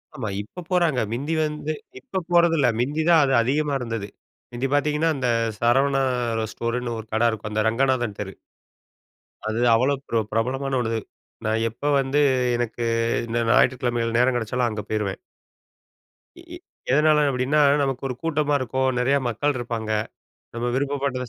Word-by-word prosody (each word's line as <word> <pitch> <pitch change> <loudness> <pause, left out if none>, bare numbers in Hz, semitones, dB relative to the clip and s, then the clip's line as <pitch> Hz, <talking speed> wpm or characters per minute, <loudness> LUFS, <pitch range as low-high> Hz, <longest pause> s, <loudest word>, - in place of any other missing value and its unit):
ஆமா, 120 -7 -4
இப்ப 175 - -10
போறாங்க. 170 -8 +2
மிந்தி 140 +7 -2
வந்து, 150 0 -3 0.3
இப்ப 190 +7 -4
போறது 170 -1 +5
இல்லை. 130 -4 +3
மிந்தி 145 +6 0
தான் 165 -3 +6
அது 135 -1 +1
அதிகமா 145 +4 0
இருந்தது. 115 -4 -4 0.5
முந்தி 125 +3 -1
பாத்தீங்கன்னா, 150 +2 +2
அந்த 135 -2 -1 0.3
சரவணா 135 +3 +3 0.5
ஸ்டோர்ன்னு 120 0 -3
ஒரு 110 - -8
கடை 115 +2 +3
இருக்கும். 105 -1 -6
அந்த 105 0 0
ரங்கநாதன் 120 -3 0
தெரு. 95 -1 -6 1.1
அது 110 +1 -1 0.2
அவ்வளவு 135 +4 +1
பிர 115 - +1
பிரபலமான 130 +4 -1
ஒண்ணு. 115 -1 -1 0.5
நான் 110 +1 +1
எப்ப 145 +6 -2
வந்து, 135 +2 +1 0.4
எனக்கு 120 0 -3 0.5
இந்த 115 +1 -2
ஞாயிற்றுக்கிழமைகள் 120 -2 +2
நேரம் 125 +1 +3
கிடைச்சாலும், 120 +1 0
அங்க 105 -1 -4
போயிருவேன். 105 -3 -2 1.2
எ - - -12
எ - - -8 0.3
எதனால 150 +2 +4
அப்படின்னா, 135 +3 +1 0.2
நமக்கு 135 -1 -2
ஒரு 125 - -3
கூட்டமா 150 -2 0
இருக்கும். 130 +1 0
நெறையா 135 +3 +2
மக்கள் 140 +5 -1
இருப்பாங்க. 115 -2 -4 0.6
நம்ம 120 +1 -2
விருப்பப்பட்டதை 140 -2 -1
130 Hz, 145 wpm, -23 LUFS, 115-145 Hz, 1.2 s, தான்